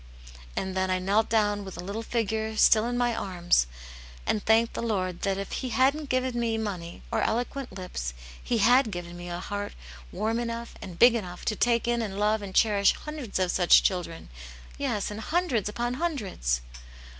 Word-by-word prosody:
" 60 -1 -18
And 190 0 -2
then 190 0 0
I 185 - +2
knelt 200 +4 +1
down 205 -2 +2
with 190 -1 -8
the 175 - -6
little 200 +4 -4
figure 220 -1 -2
still 215 +1 +6
in 245 0 -1
my 240 -1 +2
arms, 175 - +1 0.6
and 210 - 0
thanked 225 +1 +3
the - - -3
Lord 185 -6 -1
that 195 -1 0
if 195 0 -5
he 260 - -3
hadn't 270 +5 +2
given 255 -1 0
me 230 -1 0
money, 185 -6 -5
or - - +1
eloquent 245 +3 -1
lips, 180 - -5 0.3
He 240 - 0
had 245 +3 +5
given 175 -2 -6
me 175 0 -7
a 175 0 -4
heart 205 +2 -4 0.4
warm 225 +2 -1
enough 235 0 -4
and 180 -3 -8
big 240 +4 +7
enough 180 -6 -5
to 215 - 0
take 235 +1 +2
in 240 0 +1
and 200 -3 -4
love 210 +1 +2
and 195 -2 -7
cherish 205 -3 +4
hundreds 300 -8 -5
of 185 -1 +1
such 180 -2 +6
children, 175 - -2 0.5
yes, 205 - -2
and 210 - -6
hundreds 285 - 0
upon 240 +3 -2
hundreds." 210 - -1
215 Hz, 190 wpm, -27 LUFS, 185-235 Hz, 0.6 s, big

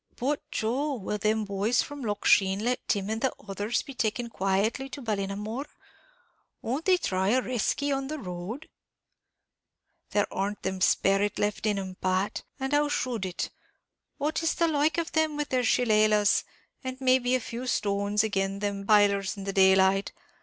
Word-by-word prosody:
"But, 280 +4 -1
Joe, 270 +6 -1
will 210 -2 -4
them 215 +1 +1
boys 200 +4 +1
from 290 -1 -8
Loch 210 -4 -3
Sheen 190 -1 +4
let 250 +1 -1
Tim 200 -2 0
and 220 +1 -2
the 265 - +2 0.2
others 205 +4 -1
be 275 - -9
taken 235 0 -2
quietly 205 +7 0
to 285 - -7
Ballinamore? 210 +4 -3 1.0
Won't 270 +8 -2
they 370 -1 +5
try 190 - -1
a 245 +5 +4
reskey 255 +3 0
on 270 0 -3
the 310 +2 -4
road?" 195 - -6 1.4
"There 205 -1 +2
arn't 200 +2 -2
that 190 0 -3
sperrit 195 +2 +2
left 205 +1 -1
in 210 -1 +1
'em, 190 -1 -5
Pat; 185 +2 0 0.2
and 265 +1 -2
how 295 0 +3
should 240 -8 -1
it? 180 - -4 0.7
what 305 +3 -1
is 330 - +1
the 335 - +2
like 305 0 +1
of 335 -1 -1
them 315 -1 +1
with 295 -1 -2
their 255 -1 +1
shilelahs, 215 -3 +3 0.4
and 260 0 -5
may 260 0 +4
be 250 0 +1
a - - +1
few 240 +1 -6
stones, 205 -1 +1
agin 195 -2 -1
them 200 -1 -2
b 200 - -10
pailers 200 -1 +4
in 195 - -6
the 195 0 -3
daylight? 190 0 +4
215 Hz, 175 wpm, -28 LUFS, 195-260 Hz, 1.4 s, they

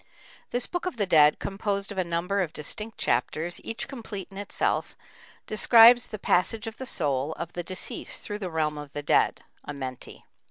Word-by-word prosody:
This 245 0 +2
"Book 355 0 -3
of 315 - -4
the 205 - +1
Dead," 150 -5 +5
composed 200 0 -3
of 195 - -4
a - - +2
number 175 +4 -1
of 170 -4 -3
distinct 210 +9 -1
chapters, 155 +8 -1
each 225 - -3
complete 220 -7 -7
in 195 - -11
itself, 205 - -1 0.5
describes 235 +2 +7
the 215 - -6
passage 205 +3 +1
of 225 0 -6
the 260 - -5
soul 145 - -1
of 170 +1 -7
the 175 - -3
deceased 185 +2 -4
through 205 0 -4
the 190 -3 -4
realm 155 -2 -1
of 145 -1 -10
the 145 - -5
dead - - +2 0.2
(Amenti). 130 -3 -7
185 Hz, 185 wpm, -26 LUFS, 155-215 Hz, 0.5 s, describes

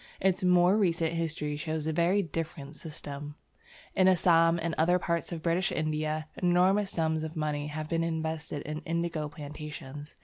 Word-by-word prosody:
Its 190 -1 +1
more 180 +2 +5
recent 170 -5 +1
history 155 -3 -2
shows 155 0 -3
a 160 - 0
very 175 +5 +3
different 160 -3 -5
system. 145 -2 -7 0.6
In 185 - +5
Assam 170 -2 +5
and 165 0 -2
other 175 +3 +3
parts 170 -1 -2
of 165 -2 -5
British 175 +3 +1
India, 155 0 -1
enormous 185 +3 +3
sums 160 -2 0
of 160 +1 -5
money 150 -2 -1
have 155 +1 -4
been 165 +1 0
invested 160 -3 -3
in 155 +1 -4
indigo 165 -2 -2
plantations. 145 -1 -8
160 Hz, 160 wpm, -29 LUFS, 155-170 Hz, 0.6 s, more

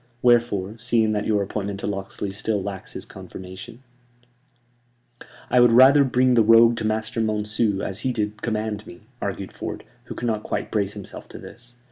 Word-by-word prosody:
Wherefore, 115 -4 +2
seeing 115 -1 +2
that 105 -1 -1
your 105 -2 +2
appointment 100 0 -4
to - - -4
Locksley 100 0 -4
still 105 0 -2
lacks 100 -1 -7
his - - -6
confirmation 105 +7 -10 0.8
" 120 0 -22
"I 125 - +5
would 120 -1 +6
rather 135 +4 +7
bring 130 -1 +2
the 120 - +5
rogue 115 +2 +6
to 110 - -1
Master 110 +1 -1
Monceux, 105 -1 0
as 95 +2 -4
he 130 +2 -1
did 110 -2 -3
command 110 -2 -3
me," 85 - -12 0.2
argued 100 -1 -4
Ford, - - -6 0.2
who - - -8
could 120 - -5
not 110 -3 0
quite - - -4
brace 100 -2 0
himself 100 -3 -9
to - - -10
this. 120 +1 -12
110 Hz, 180 wpm, -23 LUFS, 100-120 Hz, 0.8 s, rather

